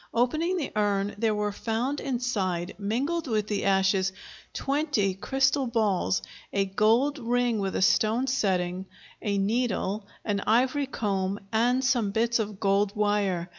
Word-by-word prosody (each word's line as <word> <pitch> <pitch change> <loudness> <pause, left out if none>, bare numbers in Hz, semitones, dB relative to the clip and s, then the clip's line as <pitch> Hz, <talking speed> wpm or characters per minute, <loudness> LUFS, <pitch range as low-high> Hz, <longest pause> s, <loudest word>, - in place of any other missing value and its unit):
Opening 310 +10 +1
the 305 - -3
urn 205 -1 +1
there 220 -1 +1
were 210 0 -1
found 235 +7 -2
inside, 200 -9 -2
mingled 275 +11 -1
with 215 -3 0
the 210 -1 -2
ashes, 190 0 +2 0.4
twenty 270 -9 0
crystal 270 +6 +1
balls, 215 -6 +1 0.3
a 200 -1 +1
gold 225 +9 +2
ring 240 -1 +1
with 195 -1 -2
a - - +2
stone 225 +6 +3
setting, 185 -6 0 0.3
a 205 -2 -1
needle, 205 -1 -1 0.2
an 205 -2 0
ivory 255 +5 +2
comb, 195 -5 -2
and 245 +4 +2
some 245 -6 +2
bits 230 +3 +1
of 210 -2 -3
gold 200 +1 +1
wire. 205 -4 0
215 Hz, 140 wpm, -27 LUFS, 195-250 Hz, 0.4 s, stone